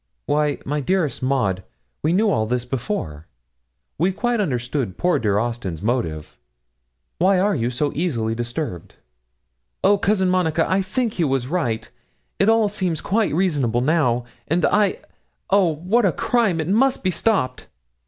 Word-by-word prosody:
Why, 150 -1 +1
my 150 +2 -1
dearest 165 0 0
Maud, 125 -8 0 0.4
we - - +1
knew 205 +4 +3
all 110 - +1
this 125 +1 -1
before. 115 - -4 0.7
We 180 +4 +3
quite 235 +3 0
understood 125 - -2
poor 180 0 +2
dear 105 -3 +1
Austin's 105 -7 -3
motive. 85 -10 -2 0.8
Why 190 +2 +4
are 200 +2 +2
you 120 -6 0
so 140 +4 -1
easily 120 -10 -1
disturbed?' 120 - -5 0.9
'Oh, 205 0 +4
Cousin 195 -2 +2
Monica, 170 -3 +1
I 190 +1 +2
think 220 +4 -1
he 175 - 0
was 135 -4 0
right; 130 -7 -2 0.5
it 195 - +4
all 225 -1 +4
seems 185 -6 -2
quite 210 -3 0
reasonable 145 - +1
now; 125 -5 +1 0.2
and 170 +3 +2
I 205 -2 +2 0.5
oh, 190 -5 +4
what 195 +9 +1
a - - +2
crime! 215 - +1
it 160 - -2
must 255 +7 +2
be 185 - +2
stopped.' 175 - 0
160 Hz, 155 wpm, -22 LUFS, 120-190 Hz, 0.9 s, Why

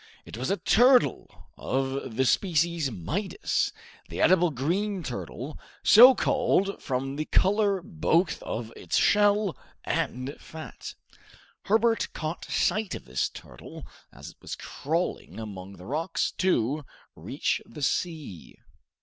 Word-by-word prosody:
It - - -9
was 125 +3 -3
a 195 - +1
turtle 250 +4 +3
of 135 -2 -2
the 130 - +2
species 170 -1 +1
Midas, 160 - -2 0.4
the - - -6
edible 180 -1 +4
green 180 +8 -1
turtle, 130 +2 -6 0.2
so 250 +4 +9
called 200 -8 +1
from 135 +1 -3
the 155 - -2
color 200 0 +2
both 170 -1 0
of 115 0 -5
its - - -2
shell 205 -2 +3 0.3
and 130 +3 -2
fat. 160 0 -9 0.7
Herbert 225 +2 +2
caught 155 +2 -4
sight 215 -2 0
of - - -9
this 65 +1 -1
turtle - - -11 0.3
as - - -11
it - - -26
was - - -6
crawling 165 -4 -3
among 100 -3 -8
the 90 -1 -13
rocks 160 - -1
to 150 -5 +1 0.3
reach - - -2
the 140 +5 -8
sea. 155 - -3
160 Hz, 125 wpm, -27 LUFS, 130-200 Hz, 0.7 s, so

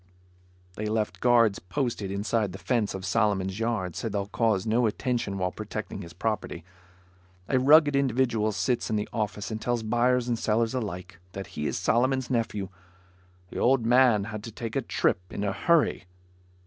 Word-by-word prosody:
They 110 - -2
left 105 -4 -1
guards 115 -4 +4
posted 115 0 -3
inside 100 0 -1
the - - -6
fence 115 -1 -1
of 95 -1 -6
Solomon's 95 -1 0
yard, 110 -7 -1
so 115 - -3
they'll 100 -1 -2
cause 105 -1 0
no 115 +2 +2
attention 110 -2 -2
while 90 -1 -1
protecting 110 0 -6
his 85 -3 -9
property. 110 -2 -3 0.8
A 130 - +2
rugged 145 +2 +6
individual 120 -5 +1
sits 120 +3 -1
in 110 - 0
the 105 0 -1
office 105 -2 -3
and 110 0 -4
tells 120 -1 -1
buyers 120 +2 +2
and 120 -2 -1
sellers 115 +2 +1
alike, 95 -6 -5
that 95 0 -5
he 75 0 -2
is - - -2
Solomon's 130 +2 +1
nephew. 115 -5 -1 0.8
"The - - -6
old 125 -2 +3
man 120 -3 +5
had 110 0 -6
to 115 - -7
take 115 +1 -6
a 135 - +1
trip 115 - +1
in 100 - -4
a 100 -1 0
hurry." 170 - +2
110 Hz, 175 wpm, -27 LUFS, 100-120 Hz, 0.8 s, rugged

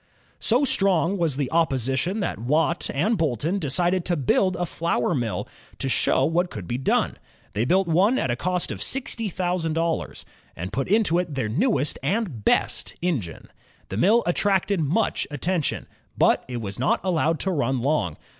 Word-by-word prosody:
So 250 +5 +2
strong 195 -5 +2
was 160 -6 0
the 140 -3 -2
opposition 160 - 0
that 195 - -2
Watt 155 +8 0
and 200 +9 0
Boulton 160 - 0
decided 175 +4 +1
to 175 - +1
build 180 +7 +2
a 175 - -1
flour 170 +1 -1
mill, 115 - -2 0.3
to - - -1
show 130 0 +3
what 175 +4 +1
could 100 - -7
be 120 - -2
done. 135 - 0 0.3
They 105 +3 0
built 185 +6 +2
one 190 +10 +3
at 130 - 0
a - - 0
cost 180 +5 -1
of - - -6
sixty 240 -5 -2
thousand 175 -3 -1
dollars, 165 0 -2 0.3
and 90 +4 -6
put 135 +3 -1
into 195 -4 +3
it 170 -5 -3
their 120 -5 -1
newest 155 - +1
and 170 - -2
best - - 0
engine. 125 - -3 0.4
The 95 - -4
mill 215 - +4
attracted 195 +1 +1
much 165 +9 0
attention. 160 +2 -1 0.3
But - - +3
it 125 -1 -4
was 100 -1 -6
not 130 - +2
allowed 165 -3 +1
to 190 - 0
run 135 -6 0
long. 125 - 0
165 Hz, 175 wpm, -24 LUFS, 130-185 Hz, 0.4 s, mill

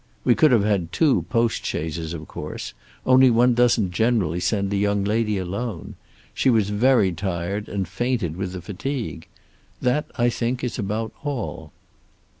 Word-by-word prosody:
We 120 - +5
could 155 +3 +4
have 115 -5 +4
had 100 -6 0
two 140 - +2
postchaises, 85 - -1
of 80 -2 -8
course, - - -6 0.3
only 130 0 +6
one 120 +1 +4
doesn't 115 -5 +3
generally 95 -5 +1
send 100 +1 0
a - - +1
young 100 0 +1
lady 105 0 0
alone. 95 +1 -4 0.4
She - - +2
was 110 -4 +2
very 110 -2 +3
tired 95 +3 -3
and 95 -3 -2
fainted 105 -3 -1
with 95 0 -4
the 90 -2 -7
fatigue. 110 - -5 0.5
That 145 +5 0
I 120 -1 +3
think 120 +2 -2
is 125 0 -3
about 110 +2 -2
all." 100 - -4
105 Hz, 155 wpm, -23 LUFS, 95-120 Hz, 0.5 s, only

